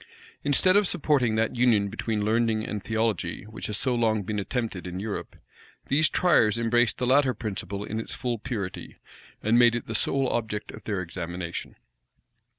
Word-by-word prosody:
Instead 145 +6 +3
of 205 -1 +4
supporting 140 -10 +2
that 110 +2 0
union 120 -5 +3
between 105 0 -2
learning 110 0 +1
and 105 -1 -4
theology, 110 -6 -1
which 110 +1 -7
has 105 - 0
so 130 - +1
long 110 -3 +1
been 105 +2 -3
attempted 105 -4 -3
in 90 +1 -5
Europe, 105 0 -5 0.5
these 145 +2 +4
tryers 115 - +3
embraced 115 0 +2
the 125 - -1
latter 130 0 +3
principle 100 -2 -4
in 110 +1 -4
its 115 - -5
full 120 -3 -2
purity, 105 -6 -5 0.5
and 115 +3 +4
made 120 -1 +6
it 120 - -3
the 115 - -5
sole 135 +4 +2
object 110 -2 -3
of - - -11
their 100 -4 -2
examination. 85 0 -5
110 Hz, 170 wpm, -26 LUFS, 105-125 Hz, 0.5 s, made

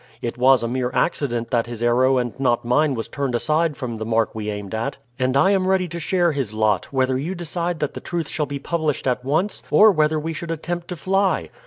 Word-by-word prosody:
It 120 - -4
was 130 0 +4
a - - 0
mere 125 +1 -1
accident 120 -8 0
that 120 -1 +1
his 120 -1 -5
arrow 130 +2 +3
and 120 -2 -1
not 120 -3 +1
mine 140 +3 +2
was 115 - -3
turned 140 -3 -2
aside 155 +4 +1
from 120 -3 -4
the 110 - -4
mark 115 0 0
we 105 -1 -4
aimed 105 -1 -5
at, 110 +1 -2 0.2
and 130 +1 +1
I 185 +8 +4
am 190 -2 +2
ready 190 -1 +2
to 170 +1 -5
share 175 +1 +1
his 130 -8 -3
lot, 110 -4 +2
whether 130 -1 +1
you 170 +7 -3
decide 170 0 -2
that 150 - -1
the - - -6
truth 170 -3 -3
shall 150 0 -2
be 140 +1 -4
published 155 0 -2
at 125 -1 0
once, 160 +9 0
or 215 0 +7
whether 155 -3 +2
we 160 +2 -3
should 165 +2 -6
attempt 170 +2 -4
to 180 - -5
fly." 195 +3 0
140 Hz, 235 wpm, -22 LUFS, 120-170 Hz, 0.2 s, or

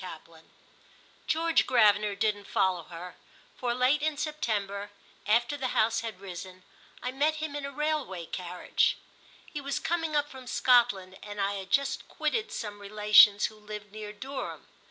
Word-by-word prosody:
VIII 165 -2 -10 0.9
GEORGE 330 +1 +2
GRAVENER 210 -4 +4
didn't 205 -1 -1
follow 185 -3 +1
her, 175 +1 -9 0.4
for 240 -1 -1
late 255 +4 +3
in 310 -1 0
September, 210 -10 -2 0.4
after 235 +6 +3
the 260 -3 -3
House 225 +1 +3
had 225 -5 -6
risen, 185 -1 -9 0.4
I 250 - -1
met 295 +4 +1
him 310 -1 -4
in 285 -1 -3
a - - -7
railway 290 - -2
carriage. 180 +1 0 0.5
He 295 - -6
was 280 0 -2
coming 325 -2 -1
up 295 0 +2
from 260 -3 -11
Scotland 220 -8 +3
and 205 0 -8
I 200 0 +1
had 195 -1 -6
just 275 +5 +1
quitted 450 -1 -2
some 205 -2 -5
relations 210 0 +6
who 215 - -5
lived 210 -1 -8
near 210 0 -7
Durham. 265 +6 -6
215 Hz, 155 wpm, -29 LUFS, 200-280 Hz, 0.9 s, relations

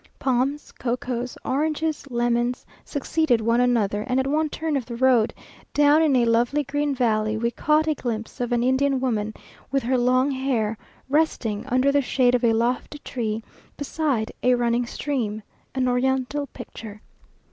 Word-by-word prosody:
Palms, 265 +3 0
cocoas, 250 0 -3
oranges, 305 +2 -1
lemons, 240 0 0 0.2
succeeded 285 -3 0
one 230 +2 +2
another, 210 -4 +1
and 255 0 +1
at 265 - +1
one 305 +3 +1
turn 315 0 -2
of 270 - 0
the 235 - -5
road, 245 -3 +3 0.4
down 295 +2 +5
in 300 -4 +3
a 245 -2 +4
lovely 235 +6 +2
green 290 +1 -1
valley, 215 -3 +1
we 235 +1 0
caught 305 +4 +2
a 310 - +3
glimpse 230 -4 -5
of 245 0 -2
an 240 0 +2
Indian 265 +1 +2
woman, 220 -5 -1 0.4
with 275 -1 0
her 250 +2 +1
long 255 +3 +3
hair, 255 -5 0 0.3
resting 265 -6 0
under 255 +2 +3
the 285 0 +3
shade 250 -1 +2
of 250 0 +1
a 235 - +5
lofty 240 +5 -1
tree 225 -3 -3 0.3
beside 285 -6 -1
a 250 0 +4
running 240 0 +1
stream 230 -7 -3 0.3
an 260 -1 +1
Oriental 265 +3 0
picture. 215 -3 -10
250 Hz, 160 wpm, -24 LUFS, 235-280 Hz, 0.4 s, down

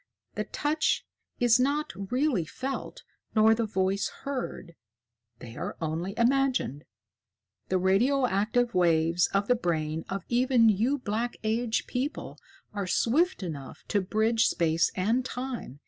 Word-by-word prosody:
The - - -3
touch 305 +1 0 0.3
is 240 0 +4
not 285 +4 0 0.2
really 255 - +1
felt 265 - -6 0.3
nor 220 0 +6
the 225 0 -1
voice 190 -1 0
heard: 255 -10 -5 0.6
they 115 -1 -10
are - - -5
only 165 +5 -3
imagined. 250 - +1 0.8
The 185 - +2
radioactive 235 +3 +2
waves 170 -1 +3
of 200 +1 0
the - - +5
brain 160 -7 -2
of 195 -2 -4
even 245 -1 +4
you 225 +8 +2
Black 235 0 -3
Age 220 +1 0
people 265 +4 -4 0.3
are 200 -2 -3
swift 290 - +1
enough 145 -6 -7
to 205 - +2
bridge 220 +4 +2
Space 165 -1 +1
and 225 +7 +1
Time. 250 - -6
220 Hz, 130 wpm, -28 LUFS, 185-250 Hz, 0.8 s, nor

